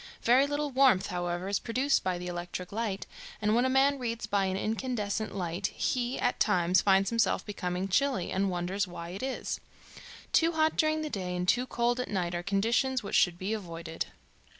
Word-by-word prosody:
Very 255 +4 +5
little 290 0 -2
warmth, 255 -7 +4
however, 175 +1 -2
is 200 0 0
produced 260 +5 +1
by 185 -1 0
the 180 - -6
electric 175 0 -5
light, 210 -2 -2 0.3
and 210 0 +1
when 240 +3 +3
a - - +2
man 270 +1 +3
reads 230 -2 -3
by 200 -1 +1
an 190 0 -1
incandescent 220 -1 -2
light 180 +1 -2
he 245 +2 -1
at 245 - 0
times 180 -3 +3
finds 195 0 +3
himself 230 -1 +1
becoming 185 -2 -3
chilly, 250 -1 +1
and 195 +1 +1
wonders 185 +3 -1
why 170 -1 -7
it 185 +3 -6
is. 265 0 -3 0.7
Too 330 +1 +4
hot 315 0 +2
during 310 0 +2
the 305 - -4
day 180 -2 -3
and 180 0 -2
too 250 +6 +2
cold 240 0 0
at 250 - -3
night 180 -4 -1
are 175 - -2
conditions 230 +7 +1
which 200 - -6
should 175 -2 +4
be 190 +4 -2
avoided." 165 -5 -5
205 Hz, 195 wpm, -29 LUFS, 180-250 Hz, 0.7 s, Very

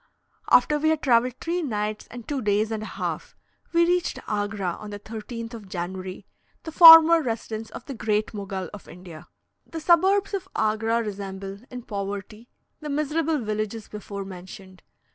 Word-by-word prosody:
After 295 +4 +4
we 315 +1 +2
had 315 -1 0
travelled 245 -1 +3
three 345 +2 -2
nights 215 -6 -3
and 240 -2 -10
two 285 -3 -2
days 210 +1 +1
and 220 -1 -3
a - - -5
half, - - -5 0.4
we 340 0 +4
reached 355 0 0
Agra 205 -4 -2
on 210 - -8
the 205 - -6
13th 230 +2 -7
of 215 -4 -10
January 185 +1 -6 0.4
the 320 - -7
former 325 0 +10
residence 225 -3 -4
of - - -10
the 275 - -6
Great 215 -2 -1
Mogul 195 -3 -5
of 205 - -11
India. 175 -2 -12 0.4
The 325 - -6
suburbs 380 +5 +3
of 380 -1 -4
Agra 225 +2 +1
resemble, 195 -1 -6
in 250 -1 -8
poverty, 205 +2 -6 0.3
the 300 - -7
miserable 305 +2 0
villages 215 -2 -3
before 200 -1 -7
mentioned. 185 0 -11
220 Hz, 160 wpm, -25 LUFS, 200-295 Hz, 0.4 s, former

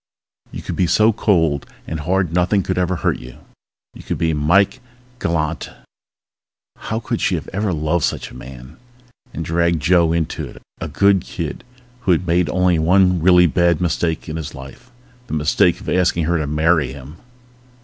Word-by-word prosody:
You - - -7
could - - -4
be 90 - +1
so 110 +6 +4
cold 80 -10 +1 0.2
and 80 - -4
hard 90 +2 0
nothing 90 +3 +2
could - - -2
ever 90 0 0
hurt 85 - -1
you. 60 - -11 0.6
You - - -12
could - - -4
be 80 -1 0
Mike 85 +7 +2 0.4
Galante... 80 - -2 1.1
How 110 - -4
could 115 - -3
she - - +1
have - - -4
loved 85 -5 0
such - - -2
a - - -13
man? 65 +3 -11 0.5
And 80 - -5
dragged 85 0 +1
Joe 85 +1 +3
into 85 -2 -2
it, - - -13 0.2
a - - -4
good 100 +5 +3
kid 85 -3 -6 0.4
who 95 -7 +2
had 90 +2 -1
made 85 -1 +1
only 90 -2 +2
one 90 +1 +3
really 90 +1 +6
bad 85 -1 +2
mistake 85 -2 -1
in 80 0 -4
his 80 -4 -6
life 70 - -12 0.4
the - - -3
mistake 75 +1 +2
of - - -12
asking 90 -2 +1
her 85 +1 +1
to 75 - -2
marry 75 -2 +2
him. 70 +4 -11
85 Hz, 175 wpm, -19 LUFS, 75-90 Hz, 1.1 s, really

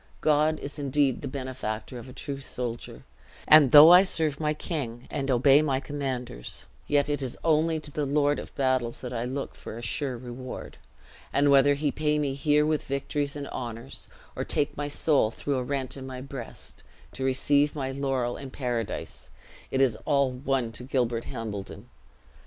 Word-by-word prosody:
God 155 +1 +3
is 145 +2 -7
indeed 140 -2 +1
the 140 - -4
benefactor 130 -3 -5
of 120 +2 -11
a - - -9
true 140 +1 -6
soldier; 125 -3 -6 0.4
and 150 -4 +8
though 150 +3 +11
I 180 +2 +9
serve 155 -6 0
my 150 -1 +1
king, 125 -8 -4
and 135 0 -2
obey 135 +3 +5
my 140 -4 +1
commanders, 130 - -5 0.2
yet 145 -1 +2
it 145 -1 -1
is 130 -3 -4
only 160 0 +2
to 150 -1 -9
the 145 0 -2
Lord 145 +1 +2
of - - -10
battles 130 -3 0
that 125 -1 -6
I 120 0 -2
look 135 +3 -4
for 110 - -9
a 120 - -8
sure 130 0 -2
reward. 125 +1 -8 0.5
And 145 0 +3
whether 140 +1 +6
he 145 0 0
pay 150 -1 0
me 145 -2 0
here 150 +2 +2
with 155 -1 -1
victories 140 +1 -2
and 145 -1 -5
honors, 120 +1 -7 0.3
or - - -2
take 145 - 0
my 145 0 -3
soul 145 -4 +2
through 140 +4 -3
a 130 - -1
rent 135 0 -3
in 135 -1 -8
my 130 -1 -6
breast, 130 -3 -9 0.3
to 130 - -5
receive 140 +3 +2
my 135 -2 -2
laurel 135 -3 -1
in 135 - -8
paradise, 120 -5 -4 0.4
it 135 - 0
is 125 -5 +2
all 140 -3 +2
one 130 -2 -1
to 115 +2 -4
Gilbert 120 -3 -1
Hambledon. 105 -4 -7
135 Hz, 180 wpm, -27 LUFS, 125-145 Hz, 0.5 s, though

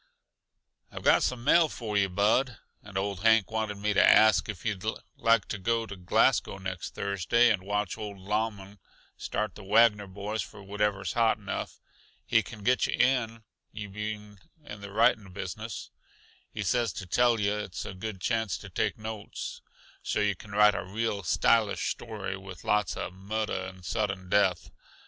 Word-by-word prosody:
"I've - - -8
got - - +5
some 125 -2 -1
mail 160 +4 +5
for 110 -6 -5
yuh, 100 -1 +3
Bud. 105 +6 +2 0.2
And 100 -2 -8
old 100 -1 -2
Hank 110 0 +4
wanted 110 -2 -2
me 105 +1 0
to - - +5
ask 110 0 +6
yuh - - -1
if 90 - -16
you'd 105 -4 -2 0.3
like 115 -3 +3
to 100 - -3
go 115 +3 0
to 100 - -8
Glasgow 90 +1 +2
next 95 -2 -6
Thursday 100 +5 +2
and 105 - 0
watch 100 0 -2
old 105 -2 -6
Lauman 100 0 -3 0.4
start 105 -2 -3
the 105 - -11
Wagner 105 0 +4
boys 100 +3 -4
for 100 - -10
wherever's 100 -2 -1
hot 115 -1 +3
enough. 105 -2 -5 0.5
He 115 -2 +4
can 105 +2 -11
get 125 +4 +3
yuh - - -1
in, 115 -4 +1 0.3
you 105 -2 -7
being 105 0 -6 0.3
in 105 -6 -9
the 100 0 -8
writing 105 -1 +2
business. 100 +3 -6 0.6
He - - -4
says 120 -5 +1
to 95 - -6
tell 120 +5 +3
yuh 105 0 +1
it's 100 -2 -5
a 95 - -6
good 95 +1 -6
chance 110 -1 0
to - - -11
take - - -1
notes, 110 -1 -6 0.4
so - - -1
yuh 105 -1 +2
can 100 - -14
write 105 0 +6
a - - -3
real 105 +1 -2
stylish 105 +3 +2
story, 105 -4 -5
with 95 -2 -10
lots 105 -3 +1
uh - - -4
murder 95 +1 -3
and 95 -1 -12
sudden 100 -3 -2
death 95 -2 +3
in - - -17
it. - - -37
105 Hz, 180 wpm, -28 LUFS, 95-110 Hz, 0.6 s, ask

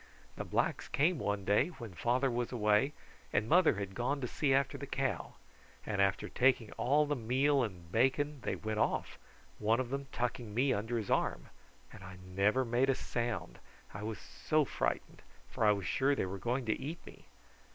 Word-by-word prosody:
The - - -4
blacks - - 0
came 160 +4 +2
one 100 -1 -2
day 100 +9 +3
when 120 - -9
father 125 - +1
was 120 0 -2
away, 105 +3 +2 0.4
and 105 - +1
mother 170 -2 +5
had 100 -1 -4
gone 125 +7 -1
to 125 - -1
see 140 +3 0
after 135 0 +2
the - - -6
cow, - - -2 0.5
and 105 -2 0
after 100 -1 +1
taking 125 -4 +2
all 145 +4 +2
the 145 0 -1
meal 135 +4 +2
and 90 -7 -5
bacon 135 +5 +1
they - - -2
went 110 -1 -3
off, - - -1 0.4
one 110 +3 +2
of 130 -1 -2
them 140 0 -3
tucking 120 -3 -3
me 130 +2 +3
under 115 +2 -2
his 110 -3 -3
arm, - - 0 0.4
and 100 - -11
I 95 -1 -9
never 100 +8 +2
made 125 +3 +2
a 135 - +3
sound, 115 -10 -3 0.3
I 95 - -6
was 110 0 -4
so 155 -1 0
frightened, - - -2 0.3
for - - -3
I 105 - +7
was 100 -3 -1
sure 140 +8 +2
they - - 0
were 95 +1 -5
going 125 +3 -1
to 110 - 0
eat 155 +5 -6
me. - - -14
120 Hz, 195 wpm, -33 LUFS, 105-135 Hz, 0.5 s, I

